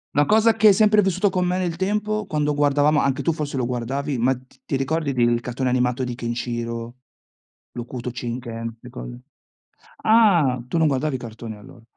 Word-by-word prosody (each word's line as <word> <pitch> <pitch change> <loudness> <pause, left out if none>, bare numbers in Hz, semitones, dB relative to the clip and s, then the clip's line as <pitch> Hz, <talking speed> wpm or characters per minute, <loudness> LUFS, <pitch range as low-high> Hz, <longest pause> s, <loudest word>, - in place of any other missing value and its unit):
Una 145 - +4
cosa 220 +3 +4
che 220 -1 +5
hai 200 - +8
sempre 210 +1 +4
vissuto 195 +1 +1
con 185 -1 0
me 180 +1 0
nel 180 -3 -1
tempo? 210 +3 -1
Quando 150 -3 0
guardavamo, 145 +1 +3
anche 135 -2 0
tu 165 - +1
forse 150 -3 -4
lo 125 - 0
guardavi, 130 +3 -2
ma 130 +3 +2
t 130 +1 -19
ti - - -2
ricordi 145 +2 -1
del 120 -1 +2
cartone 125 +2 -2
animato 125 +1 +1
di 125 - -3
Ken 120 0 -4
Shiro, 115 0 -4 0.8
l'Hokuto 120 0 -6
Shinken? 115 -2 -5
Ste 125 - -12
cose? 120 0 -9 0.8
Ah! 175 - +4
Tu 170 - -2
non 160 - +4
guardavi 140 0 0
cartoni 115 -2 -8
allora? 105 +2 -15
135 Hz, 185 wpm, -22 LUFS, 120-170 Hz, 0.8 s, hai